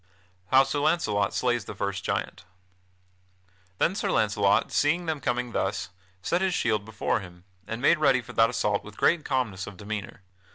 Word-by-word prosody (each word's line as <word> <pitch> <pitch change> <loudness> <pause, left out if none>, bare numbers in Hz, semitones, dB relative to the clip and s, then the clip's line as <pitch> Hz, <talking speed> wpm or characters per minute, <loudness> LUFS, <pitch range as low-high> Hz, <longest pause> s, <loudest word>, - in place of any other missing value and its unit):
[Sidenote: 90 0 -36
How 135 +1 +6
Sir 145 - -2
Launcelot 145 - +1
slays 120 -4 0
the - - -7
first 100 -1 -3
giant] - - -3 1.3
Then 175 - +2
Sir 200 0 -2
Launcelot, 105 - +2
seeing 170 +4 +1
them 160 -2 -2
coming 125 0 -1
thus, 95 -2 -2 0.3
set 175 - 0
his 190 -2 +1
shield 110 -3 0
before 110 +1 -1
him, 90 -2 -12 0.2
and 115 +3 -5
made 165 +2 +5
ready 135 -4 +4
for - - -11
that 115 0 +4
assault 105 -4 0
with 105 -1 -12
great 170 -3 +3
calmness 120 -8 -2
of 100 - -9
demeanor. 100 -1 -6
110 Hz, 175 wpm, -27 LUFS, 100-135 Hz, 1.3 s, How